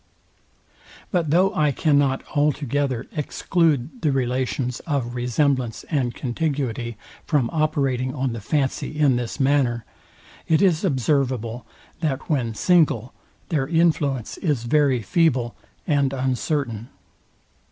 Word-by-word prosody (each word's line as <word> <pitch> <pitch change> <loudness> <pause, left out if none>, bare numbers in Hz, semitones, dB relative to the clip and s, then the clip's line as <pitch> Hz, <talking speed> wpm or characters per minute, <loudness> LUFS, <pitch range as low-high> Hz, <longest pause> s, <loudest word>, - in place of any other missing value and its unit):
But 170 -5 +1
though 185 +5 +3
I 150 -1 +2
cannot 140 -2 +2
altogether 145 -3 0
exclude 155 - 0
the 150 - +2
relations 125 -1 -1
of 135 -6 -1
resemblance 125 0 0
and 130 -6 0
contiguity 125 -4 -2 0.3
from 140 -7 +1
operating 140 -5 0
on 130 -3 -1
the 115 - -6
fancy 145 +4 -1
in 145 -4 +4
this 120 +3 -3
manner, 130 -4 +2 0.6
it 160 -1 +4
is 180 -3 +3
observable 130 - 0 0.3
that, 155 -2 -2
when 120 -6 0
single, 145 - +2 0.4
their 145 -5 0
influence 150 -6 +1
is 145 -9 0
very 130 -2 +2
feeble 125 - +1 0.3
and 140 -4 +1
uncertain. 130 -2 -2
135 Hz, 110 wpm, -23 LUFS, 125-150 Hz, 0.6 s, in